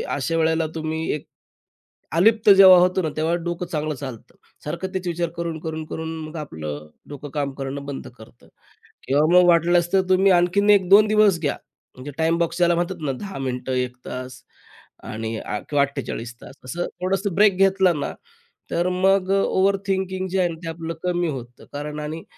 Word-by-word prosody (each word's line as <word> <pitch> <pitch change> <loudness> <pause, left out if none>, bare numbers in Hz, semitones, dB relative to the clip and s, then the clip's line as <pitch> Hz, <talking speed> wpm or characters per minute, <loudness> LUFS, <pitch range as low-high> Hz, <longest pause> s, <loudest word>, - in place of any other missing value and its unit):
अशा 155 +4 -1
वेळेला 160 0 +1
तुम्ही 160 0 -3
एक 150 - -8 0.9
अलिप्त 220 +4 +4
जेव्हा 190 -2 +9
होतो 180 +1 +2
ना, 160 - 0
तेव्हा 160 +2 +1
डोकं 175 +1 -3
चांगलं 155 -2 -3
चालतं. 130 -5 -9 0.3
सारखं 170 +5 -4
तेच 185 -1 -3
विचार 170 -1 -1
करून, 170 -2 -3
करून, 160 -1 -5
करून 160 +1 -5
मग 155 +2 -10
आपलं 75 - -6 0.2
डोकं 145 0 -8
काम 145 -2 -2
करणं 135 +1 -5
बंद 140 -1 -6
करतं. 110 - -17 0.6
किंवा 145 +3 +3
मग 180 0 +7
वाटलंस 175 +1 +3
तर 190 - +5
तुम्ही 190 +1 +4
आणखीन 180 +3 +3
1-2 200 +2 +5
दिवस 210 -4 +4
घ्या. 145 -3 -1 0.4
म्हणजे 130 +3 -8
टाईम 165 +1 +2
बॉक्स 170 -1 -1
ज्याला 175 -1 +3
म्हणतात 175 +2 -2
ना, 140 - 0
10 195 +9 -7
मिनिटं, 130 -1 -4
1 125 -1 -2
तास 130 0 -7 0.6
आणि 110 +1 -5
अ, 105 - -4
किंवा 145 -1 +3
48 120 -3 -5
तास. - - -12
असं 175 +7 -3 0.2
थोडंसं 195 +1 -1
ब्रेक 205 -2 +4
घेतला 190 -1 +4
ना, 145 -3 -4 0.6
तर 175 +1 0
मग 190 +1 +2
अ, 195 0 +3
ओव्हर 195 +1 +2
थिंकिंग 190 -1 -1
जे 190 +1 -1
आहे 180 -1 +2
ना, 165 - -6
ते 165 - -4
आपलं 165 0 -5
कमी 175 -1 0
होतं. 125 -4 -8
कारण 150 +1 -5
आणि 155 +2 -5
165 Hz, 180 wpm, -22 LUFS, 145-185 Hz, 0.9 s, जेव्हा